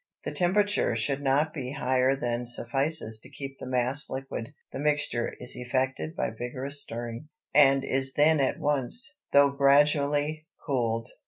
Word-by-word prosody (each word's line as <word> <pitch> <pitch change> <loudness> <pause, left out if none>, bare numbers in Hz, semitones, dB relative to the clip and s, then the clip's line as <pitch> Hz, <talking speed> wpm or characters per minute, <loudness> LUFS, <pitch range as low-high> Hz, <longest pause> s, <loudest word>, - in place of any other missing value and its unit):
The - - -2
temperature 200 - +1
should 135 +5 -1
not 145 +3 +1
be 130 -3 -5
higher 130 +1 +2
than 120 -2 -2
suffices 120 0 0
to 130 - -14
keep 135 -1 -8
the - - -7
mass 130 +3 +2
liquid; 130 -3 -5 0.2
the - - -6
mixture 145 -5 0
is 125 - -5
effected 125 - -2
by - - -1
vigorous 130 +5 -4
stirring, 120 +4 -6 0.2
and 135 -2 +5
is 135 0 0
then 155 +1 +4
at 135 - +1
once, 150 - -1 0.2
though 140 0 +6
gradually, 145 +2 +2 0.2
cooled. 115 -5 -1
135 Hz, 150 wpm, -27 LUFS, 125-145 Hz, 0.2 s, though